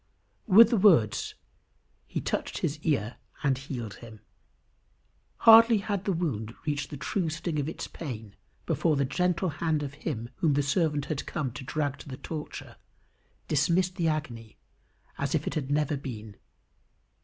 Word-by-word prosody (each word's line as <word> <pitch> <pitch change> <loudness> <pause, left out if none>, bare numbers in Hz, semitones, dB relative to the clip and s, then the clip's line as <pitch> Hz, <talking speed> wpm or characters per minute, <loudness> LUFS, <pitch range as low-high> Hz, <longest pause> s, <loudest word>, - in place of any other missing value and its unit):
With 225 +3 +8
the 235 - +3
words, 170 - +4 0.7
"he - - -3
touched - - -2
his 150 +1 -2
ear 135 -8 -1 0.3
and 140 -2 +3
healed 125 -6 -6
him." 110 -2 -11 1.3
Hardly 230 0 +9
had 200 -1 -3
the 200 - +1
wound 120 - -2
reached 145 -3 -2
the 145 - -7
true 170 +4 -1
sting 155 0 -3
of 145 +1 -1
its - - -5
pain, 110 -10 -7 0.3
before 160 -3 +1
the 140 -1 +1
gentle 180 +5 0
hand 160 -3 +1
of 140 -1 -5
him 125 -5 -5
whom 150 -4 +2
the 145 - +2
servant 145 0 +1
had 150 -2 -4
come 140 -5 -2
to 130 - -8
drag 145 +1 -2
to - - -11
the 130 - -6
torture, 155 +1 -7 0.7
dismissed 175 +5 +2
the 170 -4 0
agony 120 -8 -3 0.6
as - - 0
if - - 0
it - - -2
had 140 -3 -3
never 150 0 +1
been. 110 -6 -7
150 Hz, 160 wpm, -28 LUFS, 130-170 Hz, 1.3 s, Hardly